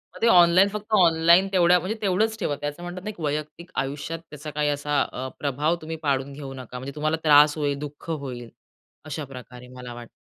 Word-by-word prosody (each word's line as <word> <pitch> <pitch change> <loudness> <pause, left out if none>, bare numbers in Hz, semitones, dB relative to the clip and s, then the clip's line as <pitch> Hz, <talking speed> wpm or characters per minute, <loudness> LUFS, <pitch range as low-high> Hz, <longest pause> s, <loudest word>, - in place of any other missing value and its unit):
तर - - -12
ते 230 - +4
ऑनलाईन 180 -1 +6
फक्त 210 +1 -6
ऑनलाईन 170 0 +5
तेवढ्या 180 -1 +5
म्हणजे 185 +6 -3
तेवढंच 215 +3 +1
ठेवा. 150 -8 -1
ते 145 - -2
असं 145 +4 -7
म्हणतात 180 +1 -7
ना 215 - -4
एक 205 - -9
वैयक्तिक 155 +3 -4
आयुष्यात 145 +4 -3
त्याचा 150 +1 -8
काही 150 0 0
असा, 145 0 0
अ, 130 +1 -6
प्रभाव 145 +4 0
तुम्ही 160 +1 -5
पाडून 140 -1 0
घेऊ 135 -1 -8
नका. 125 -1 -8
म्हणजे 135 +2 -7
तुम्हाला 155 +1 0
त्रास 150 0 +6
होईल, 145 -2 -1
दुःख 150 +2 -8
होईल. 130 -6 -5 0.6
अशाप्रकारे 130 -4 -8
मला 125 -1 -8
वाटतं. 120 -1 -10
150 Hz, 200 wpm, -24 LUFS, 140-175 Hz, 0.6 s, ऑनलाईन